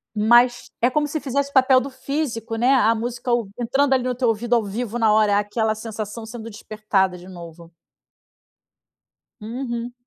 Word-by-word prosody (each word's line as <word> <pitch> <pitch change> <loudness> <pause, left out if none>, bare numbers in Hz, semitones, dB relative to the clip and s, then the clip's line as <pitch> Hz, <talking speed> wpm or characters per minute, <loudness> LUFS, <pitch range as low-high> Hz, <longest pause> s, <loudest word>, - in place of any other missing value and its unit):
Mas 240 +3 +3
é 245 - +4
como 300 +3 +1
se 300 +1 -3
fizesse 280 +1 -2
o - - -24
papel 260 -1 +5
do 265 - -5
físico, 260 -4 -4
né, 240 +3 +2
a 230 -3 +4
música 240 +2 -4
ou 240 -4 +1
entrando 270 +4 +1
ali 260 -1 +3
no 255 0 -1
teu 250 0 0
ouvido 230 +2 0
ao 230 - 0
vivo 225 +3 -4
na 220 -2 +3
hora, 210 -1 +3
aquela 215 +1 -1
sensação 220 0 -6
sendo 225 0 -8
despertada 205 -3 -1
de 180 +1 -13
novo. 170 -2 -11 1.7
Uhum. 235 +1 -5
235 Hz, 175 wpm, -22 LUFS, 215-255 Hz, 1.7 s, papel